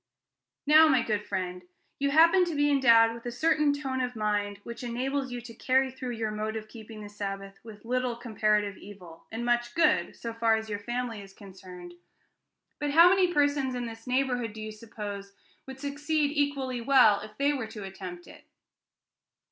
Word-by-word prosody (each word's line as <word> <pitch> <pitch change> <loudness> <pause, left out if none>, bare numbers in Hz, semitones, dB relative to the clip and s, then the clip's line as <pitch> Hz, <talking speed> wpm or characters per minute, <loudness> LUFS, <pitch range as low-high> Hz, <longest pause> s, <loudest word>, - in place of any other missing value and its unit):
Now, 310 +2 +7
my 260 -6 +3
good 210 -2 -1
friend, 180 -1 -3 0.4
you 280 0 +1
happen 335 +5 +6
to 340 -3 -4
be 290 0 +2
endowed 230 -5 +5
with 230 0 -10
a - - -3
certain 305 +3 +2
tone 270 -2 -3
of 250 -1 -3
mind 205 -2 -1
which 235 0 -8
enables 260 +3 -2
you 245 0 -5
to 230 0 -11
carry 260 +3 +1
through 255 -1 -6
your 220 -1 -2
mode 215 +1 -3
of 220 -1 -6
keeping 220 -1 -11
the 205 - -8
Sabbath 195 -1 -6
with 220 -1 -13
little 250 0 -1
comparative 215 -4 0
evil, 180 -5 -13
and 230 +2 -4
much 240 0 0
good, 330 -2 +2
so 230 -1 -6
far 230 -1 +2
as 220 0 -5
your 205 - -3
family 240 0 -4
is 195 -1 -13
concerned; 185 -3 -12 0.9
but 295 -1 -1
how 335 +4 +7
many 370 -1 +3
persons 285 -4 +1
in 245 -1 -3
this 225 +1 -9
neighborhood, 250 -3 0
do 220 - -9
you 215 - -6
suppose, 205 -2 -8 0.3
would 265 0 -9
succeed 290 +1 -1
equally 275 -4 -1
well 250 -5 +5
if 215 0 -11
they 285 +1 +2
were 255 -6 -4
to 220 -2 -9
attempt 185 -2 -8
it? - - -15
235 Hz, 190 wpm, -28 LUFS, 210-270 Hz, 0.9 s, Now